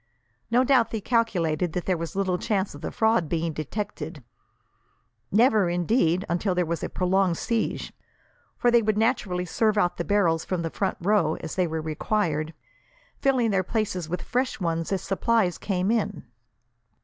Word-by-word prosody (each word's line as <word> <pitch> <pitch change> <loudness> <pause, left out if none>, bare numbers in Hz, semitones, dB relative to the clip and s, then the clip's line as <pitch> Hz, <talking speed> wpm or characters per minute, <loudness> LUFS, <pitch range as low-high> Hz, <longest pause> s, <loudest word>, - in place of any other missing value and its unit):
No 245 +2 +4
doubt, 255 -4 +4
they 225 - -3
calculated 180 -8 0
that 180 - -3
there 185 - +1
was 165 +2 -5
little 190 -2 0
chance 195 -2 -1
of 145 - -11
the - - -3
fraud 220 -8 +1
being 165 -1 -1
detected 160 - -5 1.1
never, 215 -3 +4
indeed, 175 0 +1
until 180 +3 0
there 180 -1 +1
was 170 0 -3
a - - -2
prolonged 185 -1 +1
siege 230 -2 -2 0.6
for 240 - +3
they 235 0 +5
would 215 -1 0
naturally 210 -6 0
serve 215 +4 +1
out 175 -4 +2
the 170 - -1
barrels 170 -5 +2
from 180 -3 -2
the 165 - -3
front 195 -2 -1
row, 175 -4 +2
as 160 - -5
they 185 -2 +1
were 160 0 -3
required, 155 -1 -1 0.6
filling 255 -5 +2
their 195 -1 +2
places 185 -4 -2
with 180 +1 -3
fresh 255 -1 -1
ones 165 -2 -2
as 190 -2 -1
supplies 195 -2 +1
came 190 0 0
in." 230 -3 -1
185 Hz, 170 wpm, -26 LUFS, 170-220 Hz, 1.1 s, they